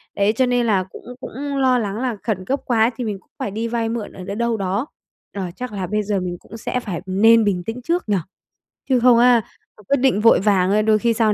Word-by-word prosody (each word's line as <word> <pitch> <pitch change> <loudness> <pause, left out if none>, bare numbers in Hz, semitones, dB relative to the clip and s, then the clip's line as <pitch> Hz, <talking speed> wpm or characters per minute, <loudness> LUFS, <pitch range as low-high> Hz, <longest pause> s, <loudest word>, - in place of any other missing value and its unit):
Đấy, 200 +1 +2
cho 260 +3 +2
nên 245 -1 +1
là 200 -4 +2
cũng 185 - -14 0.2
cũng - - -7 0.3
lo 260 -2 +3
lắng 205 -4 -2
là 250 -3 -1
khẩn 190 -5 -2
cấp 275 +7 -1
quá 230 -2 +3
thì 245 - -4
mình 205 -3 -3
cũng - - -34
phải 205 - -3
đi 225 +3 -3
vay 230 -1 -1
mượn 230 -2 -4
ở - - -10
ở - - -7
đâu 200 - -5
đâu 235 0 0
đó. 200 +6 -2 0.5
Ờ, 200 - -4
chắc 250 -1 -6
là 195 -3 -4
bây 210 +3 -1
giờ 205 -1 -1
mình 180 -1 -4
cũng 225 - -12
sẽ 250 +3 -2
phải 195 -9 -5
nên 220 +4 +5
bình 190 -4 0
tĩnh 225 +6 -5
trước 335 -1 -2
nhỉ, 205 - +3 0.7
chứ 255 -2 +4
không 245 0 +5
á, 245 -1 +5 0.4
mà 210 - -17
quyết 280 - +3
định 255 -5 +2
vội 230 - +6
vàng 200 +1 +2
đôi 215 -1 +4
khi 235 +1 +2
sau 220 -2 +2
220 Hz, 260 wpm, -21 LUFS, 200-240 Hz, 0.7 s, vội